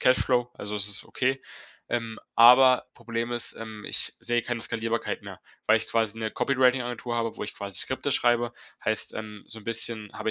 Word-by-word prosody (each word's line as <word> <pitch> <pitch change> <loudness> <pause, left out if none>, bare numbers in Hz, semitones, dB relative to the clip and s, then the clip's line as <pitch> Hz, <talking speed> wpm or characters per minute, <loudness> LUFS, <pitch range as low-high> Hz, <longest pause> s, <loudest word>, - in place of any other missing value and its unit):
Cashflow. 125 -1 +3
Also 105 +1 -6
es 100 -1 +1
ist 100 -1 0
okay. 130 +1 -1 0.5
Ähm, 115 -2 -3 0.2
aber 125 +2 +7
Problem 115 0 -4
ist, 120 -1 -1
ähm, 110 -2 -8
ich - - 0
sehe 120 0 0
keine 120 0 -3
Skalierbarkeit 115 0 -2
mehr, - - -10 0.3
weil - - +6
ich 110 - -2
quasi 115 -1 0
'ne 110 -1 -2
Copywriting-Agentur 125 -2 +1
habe, 115 -1 -2
wo - - -4
ich - - -6
quasi 100 -2 -4
Skripte - - -1
schreibe. 120 0 +2 0.3
Heißt, 110 - 0
ähm, 105 -1 -7
so 110 -1 -7
'n - - -18
bisschen 115 -2 +1
habe 110 - -2
115 Hz, 185 wpm, -27 LUFS, 110-120 Hz, 0.5 s, aber